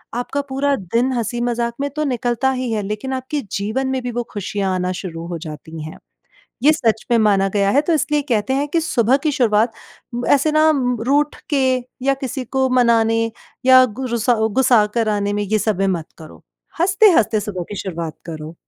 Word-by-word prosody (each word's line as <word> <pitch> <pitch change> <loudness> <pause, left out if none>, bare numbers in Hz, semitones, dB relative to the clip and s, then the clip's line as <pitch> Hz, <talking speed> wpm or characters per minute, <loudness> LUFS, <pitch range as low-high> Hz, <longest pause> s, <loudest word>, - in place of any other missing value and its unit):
आपका 245 +4 -2
पूरा 275 +1 +1
दिन 230 +6 -1
हँसी-मजाक 240 0 -1
में 285 - -1
तो 305 - -1
निकलता 245 +2 0
ही 255 -2 -2
है 215 -2 0
लेकिन 210 +6 -4
आपके 260 +3 -3
जीवन 220 +7 -2
में 265 0 -1
भी 245 - -3
वो 240 +1 -2
खुशियाँ 200 -1 -2
आना 180 0 -1
शुरू 165 -3 -6
हो 175 -1 -4
जाती 155 +1 -8
हैं। 155 - -8 0.7
ये 300 +3 +6
सच 225 -7 0
में 235 - +4
माना 200 -3 +3
गया 200 -1 +2
है 280 - +4
तो 335 - 0
इसलिए 300 -1 +1
कहते 230 +1 0
हैं 280 +2 0
कि 330 +3 +1
सुबह 260 -6 +2
की 300 - +2
शुरुआत, 225 -3 +2 0.6
ऐसे 285 +2 +3
ना 310 +1 +5 0.4
रूठ 290 +2 +2
के 290 - +2 0.5
या 275 - +4
किसी 260 +1 -4
को 265 +2 0
मनाने 225 -1 +3 0.4
या 260 0 +8
गु 255 +3 -6
रूसा 235 0 +1 0.2
गुस्सा 245 -5 +5
कराने 210 -3 0
में 205 0 -1
ये 210 +2 0
सब 210 -2 -1
में 195 - +2
मत 160 - -9
करो, 160 -2 -13 0.4
हँसते-हँसते 345 - +4
सुबह 200 -3 -4
की 205 - -6
शुरुआत 170 -4 -5
करो। 155 0 -7
235 Hz, 190 wpm, -19 LUFS, 205-265 Hz, 0.7 s, या